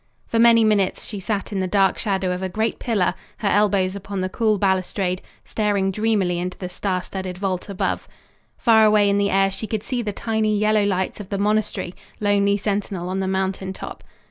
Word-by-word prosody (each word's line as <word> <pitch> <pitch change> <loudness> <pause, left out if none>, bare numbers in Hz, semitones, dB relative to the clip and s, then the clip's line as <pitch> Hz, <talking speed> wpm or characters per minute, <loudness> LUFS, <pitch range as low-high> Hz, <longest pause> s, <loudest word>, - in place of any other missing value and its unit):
For 230 - -1
many 230 -1 +6
minutes 205 -3 +1
she 205 - -5
sat 200 +1 -3
in 200 - -2
the 185 - 0
dark 195 0 +2
shadow 190 -4 0
of 180 +1 -3
a 190 - -2
great 220 +4 -1
pillar, 205 -7 +1 0.2
her 210 - -2
elbows 200 -2 +2
upon 195 0 -4
the 185 - -1
cool 215 +1 +1
balustrade, 190 -1 0 0.2
staring 205 -3 0
dreamily 200 -4 +1
into 180 +1 -4
the 180 - -5
star 185 0 -2
studded 190 -2 -5
vault 190 0 -3
above. 195 - -2 0.5
Far 225 -2 +5
away 210 -1 +5
in 200 - +2
the 200 0 +2
air 195 0 +3
she 215 +3 -5
could 215 -1 -3
see 250 -2 -2
the 215 -3 -2
tiny 215 0 0
yellow 215 0 +3
lights 190 0 -1
of 205 - -8
the 200 - -2
monastery, 210 -3 0 0.3
lonely 200 -1 +2
sentinel 200 -3 -2
on 190 +1 -2
the 190 - -1
mountain 190 0 -2
top. - - -8
200 Hz, 200 wpm, -22 LUFS, 190-215 Hz, 0.5 s, many